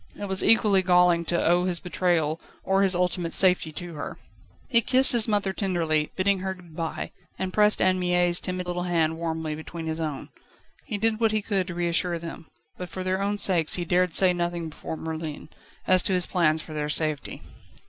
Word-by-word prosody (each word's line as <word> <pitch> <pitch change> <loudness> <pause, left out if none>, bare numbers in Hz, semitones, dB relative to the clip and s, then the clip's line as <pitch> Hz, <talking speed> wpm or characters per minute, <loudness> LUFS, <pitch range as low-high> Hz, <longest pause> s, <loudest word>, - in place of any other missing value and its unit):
It 205 - -4
was 190 -1 +2
equally 210 -4 +4
galling 180 -2 +3
to 170 +1 0
owe 175 +1 +3
his 180 -2 -1
betrayal 170 -3 -1 0.2
or 195 0 +1
his 195 -2 +3
ultimate 180 -1 0
safety 180 -4 +2
to 175 +1 -8
her. 150 - -7 0.5
He 235 -3 +5
kissed 260 +3 +6
his 235 -2 +3
mother 205 -3 0
tenderly, 165 -6 -1
bidding 195 +1 +1
her 190 0 -4
good 175 -4 -17
bye, 165 -1 -4 0.3
and 185 -1 -4
pressed 210 0 +3
Anne 185 0 +2
Mie's 175 -1 +2
timid 185 -1 -4
little 180 0 -3
hand 160 -2 0
warmly 160 -2 -3
between 160 +2 -8
his 160 0 -4
own. 155 -4 -5 0.6
He 210 - -3
did 220 +1 +1
what 225 -2 +2
he 215 -1 -1
could 195 -4 -1
to 175 - -6
reassure 175 0 -1
them, 165 -1 -9 0.3
but, 180 -1 -6
for 185 +2 -6
their 185 +1 -1
own 205 +1 -1
sakes, 175 -6 +2
he 175 - -3
dared 180 0 +1
say 185 -2 +5
nothing 175 -1 -3
before 160 +1 -7
Merlin, 160 -2 -6 0.4
as 185 -1 +4
to 190 - -1
his 180 -1 +2
plans 160 -3 +1
for 155 - -10
their 150 -1 -3
safety. 155 -1 -2
180 Hz, 200 wpm, -25 LUFS, 165-190 Hz, 0.6 s, kissed